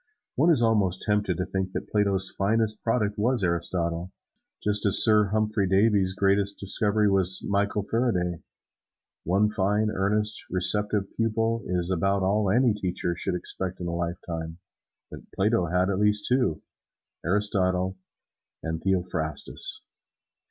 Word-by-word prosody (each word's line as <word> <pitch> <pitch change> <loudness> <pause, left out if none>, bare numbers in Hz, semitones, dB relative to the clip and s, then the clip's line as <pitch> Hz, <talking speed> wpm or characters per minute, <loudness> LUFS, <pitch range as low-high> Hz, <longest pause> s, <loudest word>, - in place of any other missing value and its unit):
One 160 +6 +2
is 145 -8 +3
almost 100 -5 +1
tempted 105 -4 0
to 90 - -2
think 95 -1 -4
that - - -5
Plato's 100 -2 +2
finest 110 +2 0
product 105 -3 -1
was 120 0 +1
Aristotle, 85 0 -2 0.5
just 105 0 +1
as 100 - +8
Sir 105 -2 +5
Humphry 105 -1 -1
Davy's 95 -1 +2
greatest 100 0 +1
discovery 105 +2 0
was 95 -2 +1
Michael 100 0 0
Faraday. 95 -7 -1 0.8
One 100 +5 +2
fine, 105 +2 0
earnest, 105 +2 0
receptive 105 +2 +3
pupil 115 0 -1
is 90 0 -1
about 95 +2 0
all 100 +1 +1
any 120 +3 +3
teacher 90 -3 -3
should 90 +1 -3
expect 90 +1 -4
in 90 - -5
a 85 - -3
lifetime, 85 -1 -5 0.5
but - - -8 0.2
Plato 100 -2 +1
had 90 +3 +1
at 95 - -2
least 105 0 +2
two, 125 -11 0 0.6
Aristotle 95 0 0 0.7
and 80 0 -4
Theophrastus. 90 -6 -1
100 Hz, 135 wpm, -26 LUFS, 90-105 Hz, 0.8 s, as